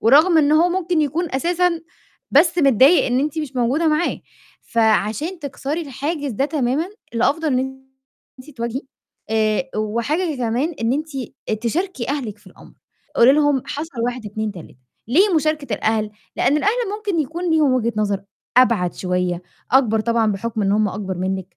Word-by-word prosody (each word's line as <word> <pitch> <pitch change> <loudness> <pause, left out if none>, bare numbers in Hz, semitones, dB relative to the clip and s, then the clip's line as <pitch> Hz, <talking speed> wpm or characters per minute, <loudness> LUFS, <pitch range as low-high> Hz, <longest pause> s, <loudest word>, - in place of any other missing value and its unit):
ورغم 310 +9 +5
إن 295 -1 +4
هو 325 +3 +5
ممكن 350 -2 0
يكون 310 +5 -1
أساسًا 340 +4 +1 0.5
بس 330 +5 +4
متضايق 275 - +5
إن 250 +1 +1
أنتِ 300 +2 -2
مش 285 -4 -5
موجودة 255 +7 +1
معاه، 310 +3 0 0.5
فعشان 225 - +1
تكسري 290 +1 -4
الحاجز 290 0 -3
ده 245 +6 0
تمامًا، 285 +1 0 0.3
الأفضل 285 +7 +1
إن 265 0 -2 0.6
أنتِ 255 - -13
تواجهي، 235 -1 -4 0.5
آآ 220 +4 +1
وحاجة 255 - -1
كمان، 250 +7 -1
إن 225 +2 +2
أنتِ 300 +4 -1 0.6
تشاركي 305 - -2
أهلِك 250 -8 -3
في - - -26
الأمر، - - -16 0.4
قولي 240 +3 +7
لهم 290 -3 +2
حصل 295 -4 -5
1، 245 -2 -3
2، 215 +1 -3
3، 175 -8 -12 0.3
ليه 365 - +4
مشاركة 305 -6 0
الأهل؟ 215 0 0 0.3
لإن 290 - +2
الأهل 390 +7 +2 0.3
ممكن 405 -6 -1
يكون 335 +4 -3
ليهم 310 -4 +3
وجهة 235 -2 +1
نظر 205 -2 0 0.3
أبعد 230 -9 +4
شوية، 180 -1 -1 0.3
أكبر 235 -5 +4
طبعًا 225 -1 +1
بحُكم 215 +2 -3
إن 195 0 +2
هم 210 0 +2
أكبر 190 -2 -5
منِّك، 190 -1 -3
265 Hz, 155 wpm, -20 LUFS, 220-310 Hz, 0.6 s, قولي